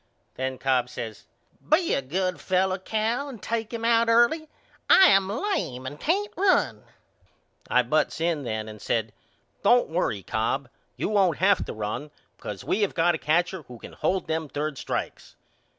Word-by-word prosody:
Then 130 0 -3
Cobb 130 -2 +1
says 115 -3 -7 0.4
Be 330 +3 +3
a - - +1
good 180 +7 -2
fellow 185 0 +1
Cal 225 +8 -1
and 245 -5 -9
take 225 0 -3
him 230 -1 -4
out 230 0 +4
early. 240 +8 +3 0.4
I 380 -1 +8
am 195 -1 +4
lame 220 - -2
and 145 +3 -7
can't 400 +6 0
run. 380 0 +2 0.8
I 125 - +4
butts 150 +5 0
in 165 -2 0
then 110 -4 -3
and 105 -1 -10
said 110 -2 -1 0.5
Don't 245 0 +4
worry, 160 - -1
Cobb. 120 +6 -1 0.3
You - - -1
won't 195 -5 +2
have 195 +1 +3
to - - -6
run 110 +7 -4 0.3
because 100 -3 -7
we 215 - 0
have 205 - 0
got 170 +1 +3
a 160 - -3
catcher 175 +4 +1
who 125 - -10
can - - -11
hold 190 -1 -1
them 160 -1 -2
third 150 -1 -3
strikes. - - -5
175 Hz, 170 wpm, -26 LUFS, -, 0.8 s, I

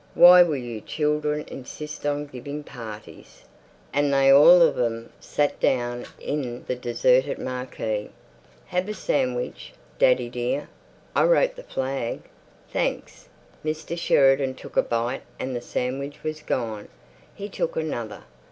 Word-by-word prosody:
Why 180 +1 +9
will 170 -4 +3
you 120 -4 -6
children 150 +1 -1
insist 150 +3 -7
on 145 0 -1
giving 145 +2 -7
parties!" 110 - -11 0.5
And 145 0 +2
they 135 0 +5
all 165 +6 +9
of - - +4
them 115 -1 -2
sat 145 0 -1
down 120 -1 0
in 125 -5 -4
the 125 - -2
deserted 125 +3 +2
marquee. 125 -4 -4 0.6
"Have 180 +3 -2
a 210 - -3
sandwich, 125 -8 -2 0.3
daddy 125 -1 +4
dear. 125 +4 -3 0.5
I - - +4
wrote - - +3
the - - -9
flag." 130 - -3 0.5
"Thanks." - - -3 0.3
Mr. 155 +2 -3
Sheridan 135 -5 +3
took - - -12
a - - +5
bite 120 +3 -2 0.2
and 130 -1 -4
the 120 - -3
sandwich 135 +4 -4
was 155 0 -4
gone. 110 -7 -3 0.5
He 200 - -6
took 190 - -3
another. 120 -9 -4
135 Hz, 135 wpm, -25 LUFS, 120-150 Hz, 0.6 s, Why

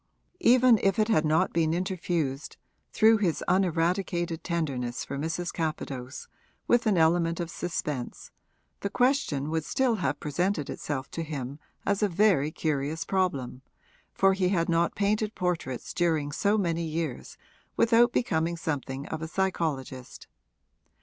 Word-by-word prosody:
Even 245 -2 +5
if 195 -1 +2
it 215 0 +2
had 160 -8 +3
not 155 +1 +2
been 160 -1 +2
interfused, 170 -6 -2 0.3
through 220 0 +5
his 185 -7 0
uneradicated 175 -1 0
tenderness 135 -6 -2
for 140 - -5
Mrs. 165 +4 -3
Capadose, 140 -5 -4 0.4
with 240 -1 +3
an 205 -4 +3
element 165 +1 +3
of 170 -1 -3
suspense, 150 -7 -4 0.5
the 200 - -2
question 200 - +1
would 160 -1 0
still 235 - +1
have 145 -5 -1
presented 165 +1 -1
itself 140 -2 -4
to 165 - -4
him 145 -3 -5 0.3
as 200 +1 +1
a 210 - +3
very 175 -6 +3
curious 155 -1 -2
problem, 140 -10 -1 0.5
for 195 0 +3
he 190 -1 +1
had 170 -3 +1
not 170 0 +1
painted 210 +1 0
portraits 170 -8 -3
during 160 -4 +1
so 205 +8 +1
many 170 -4 0
years 160 -4 -4 0.4
without 235 +1 +5
becoming 170 -8 0
something 140 -4 -4
of 160 - -4
a 160 - -3
psychologist. 155 -9 -3
165 Hz, 140 wpm, -28 LUFS, 150-195 Hz, 0.5 s, Even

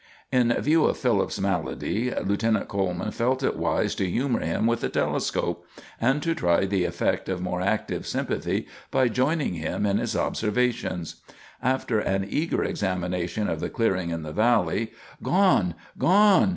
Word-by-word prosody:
In 125 -2 +3
view 155 +4 +3
of - - +1
Philip's 115 -8 +1
malady 100 +5 -1
Lieutenant 110 +1 0
Coleman 95 +1 -2
felt 130 +4 0
it - - +1
wise - - 0
to 95 - -1
humor 125 +4 0
him 85 +7 -1
with 115 0 +1
the - - -1
telescope, - - -1 0.4
and 135 +5 +2
to 165 - +1
try 85 - +2
the 95 -2 0
effect - - -1
of 95 -1 -1
more 90 0 -2
active 100 +3 -1
sympathy - - -2 0.2
by 130 -2 +3
joining 135 - +1
him 80 +4 -2
in 100 0 +2
his 120 -1 -2
observations. 110 -6 -1 0.4
After 125 -3 +1
an 95 -1 0
eager 155 +10 0
examination 90 +1 -2
of - - -2
the - - -3
clearing 95 -7 0
in 85 -1 -3
the 75 0 -6
valley, 115 0 +2 0.3
"Gone! 180 - +3 0.2
Gone!" 200 +1 +5
110 Hz, 155 wpm, -25 LUFS, 90-125 Hz, 0.4 s, Gone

